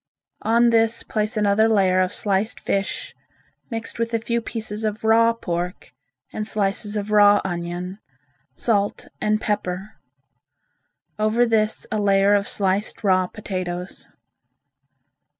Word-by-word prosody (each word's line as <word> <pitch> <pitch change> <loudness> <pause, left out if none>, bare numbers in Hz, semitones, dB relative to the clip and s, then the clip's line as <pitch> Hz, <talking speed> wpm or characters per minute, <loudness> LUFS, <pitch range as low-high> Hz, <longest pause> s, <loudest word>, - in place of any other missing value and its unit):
On 235 +1 +3
this 225 0 +2
place 215 +1 -2
another 210 +1 +3
layer 190 -4 +3
of 185 +1 0
sliced 205 +1 0
fish 200 - -2 0.6
mixed 230 -1 -5
with 230 0 -1
a - - +1
few 235 +1 -1
pieces 220 -1 -4
of 215 0 -2
raw 230 +1 +5
pork, 180 -5 -4 0.4
and 215 - -3
slices 205 0 -1
of 210 0 -3
raw 205 -1 +6
onion, 175 +2 -4 0.6
salt 205 -3 0
and 215 0 +1
pepper; 205 -1 -3 1.2
over 215 +3 +3
this 220 -2 +1
a 215 - 0
layer 200 0 +4
of 200 -1 +2
sliced 195 +2 -1
raw 185 -2 +3
potatoes. 185 -3 -5
210 Hz, 125 wpm, -22 LUFS, 195-220 Hz, 1.2 s, raw